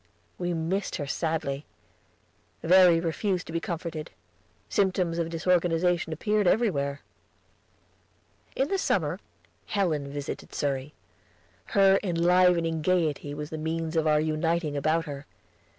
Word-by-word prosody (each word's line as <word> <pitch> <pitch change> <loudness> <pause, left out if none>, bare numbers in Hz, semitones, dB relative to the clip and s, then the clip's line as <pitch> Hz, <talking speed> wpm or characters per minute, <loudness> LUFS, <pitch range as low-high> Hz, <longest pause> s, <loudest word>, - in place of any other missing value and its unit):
We 175 -1 -1
missed 175 +5 -2
her 150 - -3
sadly. 150 -2 -2 1.0
Verry 180 -1 +6
refused 175 +3 -1
to 160 - -9
be 165 - 0
comforted. 165 -3 -5 0.6
Symptoms 185 -3 0
of 165 -1 -1
disorganization 175 0 +1
appeared 210 +5 0
everywhere. 145 -10 +1 1.5
In 270 +3 0
the 390 - 0
summer - - 0 0.5
Helen 155 -8 -1
visited 145 0 -6
Surrey. 140 0 -2 0.8
Her 195 0 +6
enlivening 175 -2 +3
gayety 155 -4 0
was 150 0 -6
the 160 - -4
means 160 +1 -3
of 160 -1 +2
our 150 0 +4
uniting 155 0 0
about 155 +3 +1
her. 145 -1 -7
165 Hz, 120 wpm, -27 LUFS, 155-180 Hz, 1.5 s, Verry